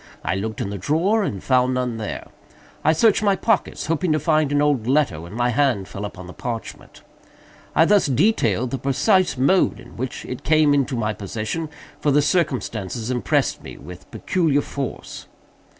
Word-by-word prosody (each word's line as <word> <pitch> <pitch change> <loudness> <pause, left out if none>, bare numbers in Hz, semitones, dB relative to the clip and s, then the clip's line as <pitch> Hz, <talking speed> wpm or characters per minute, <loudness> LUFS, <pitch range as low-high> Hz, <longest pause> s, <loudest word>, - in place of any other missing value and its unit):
I - - 0
looked 105 +3 -3
in 100 - -3
the 100 - -5
drawer, 170 - +1
and 100 - -3
found 130 -1 +2
none 125 -2 -2
there. 110 -2 -5 0.6
I 155 - +5
searched 210 +7 +3
my 200 -2 +3
pockets, 225 +1 0
hoping 165 +2 0
to 155 - +1
find 155 -1 +1
an 145 - +2
old 145 -6 +1
letter, 135 - +1
when 85 +5 -10
my 120 +1 +1
hand 125 -6 +1
fell 100 +1 -6
upon 95 -3 -8
the 90 - -10
parchment. 115 -2 -7 0.7
I 160 - +6
thus 205 -1 +4
detail 130 - +2
the 130 +1 -4
precise 175 - +2
mode 160 +9 +2
in - - -14
which 130 +2 -5
it 125 +1 -6
came 155 -1 +4
into 140 -1 +1
my 110 -2 -1
possession; 110 - -4 0.3
for 150 - 0
the 145 +1 +4
circumstances 120 - -1
impressed 125 -1 0
me - - -10
with 90 0 -12
peculiar 160 -6 0
force. 140 -2 -6
135 Hz, 180 wpm, -22 LUFS, 110-155 Hz, 0.7 s, I